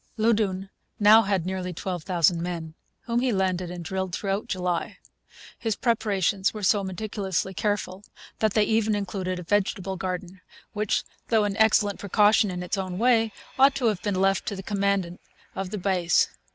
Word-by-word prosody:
Loudoun 205 -4 +1 0.3
now 215 +2 +8
had 195 -5 0
nearly 185 -1 -3
12,000 175 -1 0
men, 170 -2 -4 0.3
whom 235 0 -1
he 255 0 +1
landed 185 -3 0
and 175 -1 -7
drilled' 190 0 -3
throughout 200 +3 -2
July. 180 -5 -2 0.6
His 225 -3 -1
preparations 205 -4 0
were 210 - -6
so 200 +1 +3
meticulously 190 -1 -3
careful 195 +1 -2 0.4
that 215 -2 +1
they 215 - +5
even 220 0 +1
included 190 -2 -3
a 180 - -6
vegetable 190 0 -1
garden, 185 0 -5 0.3
which, 210 -1 0 0.2
though 220 -2 +3
an 205 -1 -1
excellent 215 -2 +3
precaution 210 +2 +3
in 180 -1 -4
its 185 +3 -2
own 185 -1 -4
way, 225 -1 +3 0.3
ought 275 +1 +6
to 255 - -1
have 205 -4 -3
been 205 -2 -1
left 195 0 +1
to 200 - -2
the 190 - -7
commandant 200 -3 -1 0.3
of 195 -1 -4
the 210 - -4
base. 180 -3 +2
195 Hz, 165 wpm, -25 LUFS, 185-210 Hz, 0.6 s, now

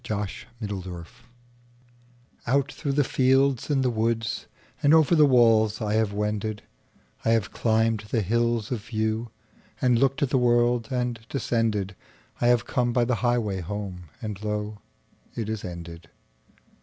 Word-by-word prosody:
Reluctance 100 -4 -5 1.4
OUT 140 +4 +2
through 140 -3 -3
the 145 +1 +3
fields 135 0 +2
and 140 -3 +2
the 125 - +2
woodsAnd 115 +5 -1
over 160 +1 +4
the 155 -3 +6
walls 115 -4 +4
I 105 -2 -1
have 110 -1 +2
wended;I 105 - -5
have 115 -3 +2
climbed 110 -1 +1
the 115 -2 +1
hills 115 +2 0
of 125 - -1
viewAnd 110 +1 -2 0.7
looked 135 +1 +2
at 135 - 0
the 130 - +3
world, 120 -1 +2
and 125 -3 -1
descended;I 115 -3 -2
have 120 -1 +3
come 120 -1 0
by 120 -1 +3
the 125 0 +1
highway 120 -5 +1
home, 95 -1 -5 0.2
And 105 -2 -5
lo, 105 0 -3 0.6
it 115 -3 -3
is 110 -2 -4
ended. 85 -1 -8
115 Hz, 130 wpm, -26 LUFS, 105-125 Hz, 1.4 s, the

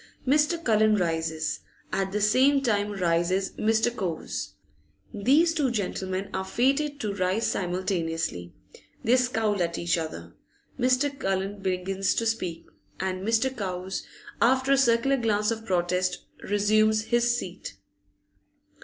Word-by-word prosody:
Mr. 300 +5 +2
Cullen 215 -3 +4
rises, 160 -3 -1 0.3
at 195 0 -1
the 210 +1 -1
same 265 +6 +4
time 210 -4 +1
rises 185 0 0
Mr. 225 +2 +1
Cowes. 180 -8 -4 0.6
These 285 +11 +3
two 295 -5 +1
gentlemen 190 -3 -3
are 190 - -1
fated 275 +8 0
to 210 -2 -2
rise 190 +3 0
simultaneously. 165 - -2 0.5
They 240 - +4
scowl 225 -6 +1
at 170 -1 -1
each 170 0 0
other. 160 -1 -6 0.5
Mr. 260 +3 +2
Cullen 195 +1 -2
begins 190 +1 -1
to 230 - 0
speak, 180 -7 -2 0.3
and 185 0 -2
Mr. 230 +5 +1
Cowes, 190 -3 -4 0.4
after 260 +3 +3
a - - +7
circular 270 +1 +3
glance 215 -3 +1
of 225 0 -5
protest, 180 0 0 0.2
resumes 215 +1 +3
his 240 +1 +2
seat. 180 - -7
205 Hz, 125 wpm, -26 LUFS, 185-240 Hz, 0.6 s, a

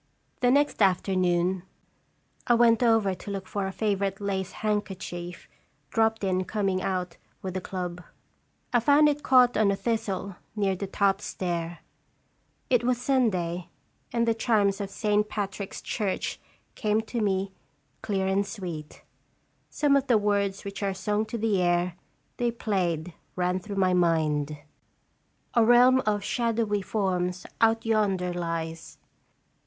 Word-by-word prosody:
The 245 - +3
next 285 -1 +2
afternoon 185 -1 +2 0.9
I 240 - +5
went 230 0 +4
over 225 -5 +3
to 185 - -9
look 195 -1 -4
for 200 -1 -2
a - - -3
favorite 200 -2 -1
lace 195 -2 -2
handkerchief, 185 -4 -3 0.4
dropped 225 -1 +1
in 185 -1 +1
coming 195 -3 -1
out 180 -2 -2 0.3
with 185 -1 -4
the 185 - -3
club. 180 -1 -5 0.7
I 240 - +5
found 290 +5 +5
it 295 0 0
caught 250 -3 +5
on 210 -1 +3
a 200 - +2
thistle, 200 -4 -2 0.2
near 200 -2 +1
the 195 +2 -4
top 195 0 +1
stair. 170 -3 -3 0.9
It 245 -3 +2
was 245 0 +1
Sunday, 185 -10 0 0.4
and 235 0 +1
the 230 - +4
chimes 210 -3 +1
of 200 - -4
Saint 210 +1 0
Patrick's 200 -1 -4
Church 200 -3 -2 0.3
came 215 +1 +1
to 230 +1 -4
me 195 -1 0 0.5
clear 195 -2 -1
and 190 +1 +2
sweet. 180 -7 -7 0.7
Some 290 -2 +2
of 275 0 +1
the 240 -3 +5
words 200 -2 0
which 200 +1 -6
are 195 -1 -1
sung 210 +3 -1
to 235 - -4
the 210 -4 +1
air 175 0 +1 0.4
they 240 -1 +1
played 180 -7 -1 0.2
ran 180 0 0
through 200 +2 -7
my 185 -2 +2
mind: 155 -4 +1 1.0
"A 235 - +5
realm 250 +3 +6
of 205 -1 +1
shadowy 225 -3 0
forms 185 -3 -1 0.2
out 225 0 +3
yonder 195 -5 +1
lies. 165 -1 -4
200 Hz, 145 wpm, -27 LUFS, 185-225 Hz, 1.0 s, realm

